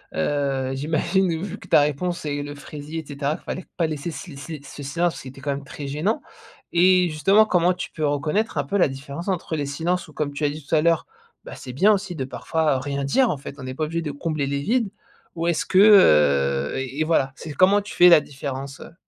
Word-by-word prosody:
heu, 135 - -1
j'imagine, 165 +4 0
vu 200 - -5
que - - -14
ta - - +5
réponse, 170 +5 -1
c'est 145 -1 -3
le 145 0 -7
fraisier, 150 +2 -7
et 160 - -8
cetera. 145 +2 -2
Il - - -27
fallait 185 - -5
pas 170 - +1
laisser 155 +2 -4
ce 165 +2 -8
le 140 - -10
ce 140 - -9
si 155 -2 -7
ce 145 - -10
silence 170 +5 -1
qui - - -10
était 135 +1 -11
quand 145 - -4
même 140 0 -5
très 145 0 -7
gênant, 165 - -1 0.5
et 180 +1 +4
justement, 195 +8 +4
comment 180 -3 +2
tu 180 - -6
peux 155 - -2
reconnaître 150 +9 -1
un 145 - +1
peu 170 +9 -1
la 185 - +4
différence 140 +5 -7
entre 175 -4 -2
les 145 - -2
silences 165 +6 -2
où, 155 - -15
comme 145 -1 -2
tu 145 +1 -2
as - - +2
dit 150 0 -8
tout - - -7
à 155 - +4
l'heure, 165 +1 +2 0.4
ben, - - -9
c'est 125 - -9
bien 195 +11 +4
aussi 195 -3 -1
de 135 - -3
parfois, 155 +3 -1
heu, - - -3
rien 140 +1 -3
dire. 245 - +2
En - - 0
fait, 140 - -9
on 130 - -7
est 130 - -4
pas 155 - -3
obligé 165 +2 -2
de 155 -3 -4
combler 145 0 -2
les 140 0 -2
vides. 230 - +1 0.5
Ou, 165 0 -2
est-ce 170 -2 0
que, 185 - +3
heu, 75 - +5
et 135 +2 -4
et - - +4
voilà, 155 -4 +1
c'est 160 - -8
comment 195 +5 +4
tu 205 - -9
fais 175 - +7
la 170 -3 +8
différence, 135 0 -6
heu? - - -11
150 Hz, 255 wpm, -23 LUFS, 140-175 Hz, 0.5 s, la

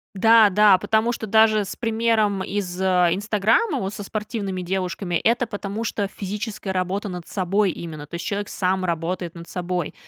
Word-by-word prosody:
Да, 225 +2 +6
да, 205 0 +6
потому 220 +4 +1
что 230 -2 -5
даже 215 0 +4
с - - -6
примером 220 -4 +1
из, 185 -2 -3
а, 180 -2 +3
"Инстаграма", 210 - +1
вот, 195 +1 -3
со - - -7
спортивными 205 -2 -4
девушками, 180 0 -2
это 235 +7 +2
потому 205 0 -5
что 205 -3 -2
физическая 205 0 -5
работа 190 +3 -2
над 180 -2 -7
собой 195 +1 +1
именно, 155 -3 -8
то 170 - -8
есть 170 - -5
человек 205 0 -3
сам 185 0 0
работает 170 0 -3
над 170 0 -10
собой, 180 -2 -3
195 Hz, 175 wpm, -23 LUFS, 180-215 Hz, -, Да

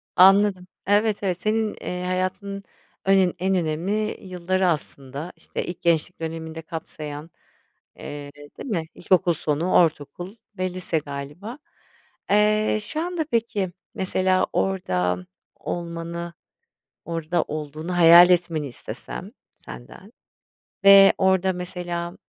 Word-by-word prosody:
Anladım. 190 0 +5 0.2
Evet, 205 +1 +2
evet. 185 -2 -1
Senin, 215 0 0
eee, 180 0 -4
hayatının 185 +2 -2 0.4
önen 190 -2 +4
en 190 +1 +1
önemli 185 +6 -1
yılları 185 0 -1
aslında, 145 -1 -3
işte, - - -5
ilk 175 - -7
gençlik 170 +1 +1
dönemini 160 0 -5
de 165 - -6
kapsayan, 155 -1 -7 0.6
eee, 145 -1 -8 0.3
değil - - -7
mi? 170 -7 -1
İlkokul 180 -1 +2
sonu, 155 +3 -1
ortaokul 165 +3 +1 0.2
ve 185 0 -1
lise 180 -3 -1
galiba. 150 - -7 0.7
Eee, 215 +1 +3
şu 305 +9 -4
anda 345 -2 -2
peki, 220 -5 0 0.2
mesela 185 0 +1
orada 90 - 0 0.3
olmanı, 170 0 -5 0.7
orada 165 0 -1
olduğunu 155 +3 -5
hayal 175 +1 +9
etmeni 170 -4 +1
istesem 120 - -8 0.2
senden 65 - -12 0.7
ve 195 0 +9
orada 190 0 +2
mesela, 175 -1 -5
180 Hz, 115 wpm, -24 LUFS, 160-195 Hz, 0.7 s, hayal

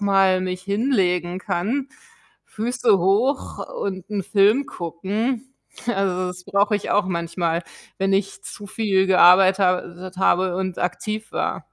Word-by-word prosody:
mal 195 -2 +3
mich 185 0 -3
hinlegen 190 - 0
kann, 235 +11 -2 0.6
Füße 230 -2 +1
hoch 215 +10 +1 0.2
und 190 -2 -4
'n 205 -2 -2
Film 210 +9 +3
gucken. 210 +9 -3 0.4
Also, 190 -4 0
das 180 0 -9
brauche 200 +2 +1
ich 205 - -6
auch 205 - +3
manchmal, 170 -1 -2 0.4
wenn 195 0 +1
ich 195 0 -1
zu 205 - -9
viel 195 -2 +1
gearbeit 190 +1 +6
habe 180 -2 +1
tet 185 +1 -10
habe 185 -1 +2
und 185 -1 -3
aktiv 215 +4 -3
war. - - -2
190 Hz, 140 wpm, -22 LUFS, 180-210 Hz, 0.6 s, gearbeit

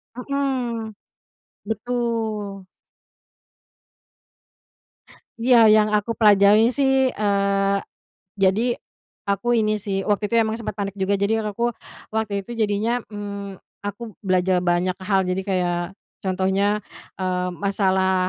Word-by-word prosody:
Mhm. 250 -4 -2 0.7
Betul. 220 -3 -3 2.7
Iya 230 -2 +6
yang 215 0 +4
aku 210 +2 0
pelajari 210 +2 +6
sih, 265 -2 +2
eee, 200 -1 +1 0.6
jadi 210 +6 +2 0.5
aku 240 +5 +1
ini 215 -1 +2
sih 195 -2 -2
waktu 210 0 +1
itu - - +2
emang 220 0 +1
sempat 215 - -5
panik 200 0 -3
juga 195 +1 0
jadi 220 +2 +1
aku, 235 +3 -1 0.4
waktu 200 -3 -1
itu 240 - -7
jadinya, 220 +2 0
mmm, 200 -2 -6 0.2
aku 205 +2 -6
belajar 185 -1 +2
banyak 175 +1 +1
hal 190 -1 +1
jadi 185 +1 -1
kayak 180 -3 0 0.4
contohnya, 190 +2 +1 0.4
eee, 180 -1 -1
masalah, 190 0 +1
205 Hz, 110 wpm, -22 LUFS, 195-225 Hz, 2.7 s, Iya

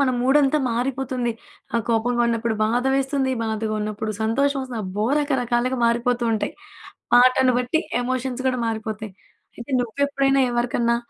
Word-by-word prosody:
మన 270 -2 +3
మూడంతా 275 +3 +3
మారిపోతుంది. 250 0 -1 0.4
ఆహ్, 230 - +2
కోపంగా 240 +1 +1
ఉన్నప్పుడు 230 -1 -1
బాధ 240 +4 0
వేస్తుంది, 270 -1 0
బాధగా 220 -1 -2
ఉన్నప్పుడు 215 +1 -3
సంతోషవొస్తుంది. 260 +1 0
అబ్బో! 205 +3 -2
రకరకాలుగా 255 -3 0
మారిపోతూ 240 +1 +1
ఉంటాయి. 220 - -2 0.6
పాటను 255 +1 +5
బట్టి, 250 +6 0 0.2
ఎమోషన్స్ 255 0 -2
గూడా 255 -1 -1
మారిపోతాయి. 220 -2 -4 0.4
అయితే, 235 +3 -9
నువ్వెప్పుడైనా, 275 +2 +1
ఎవరికన్నా 240 0 +1
245 Hz, 125 wpm, -22 LUFS, 230-265 Hz, 0.6 s, పాటను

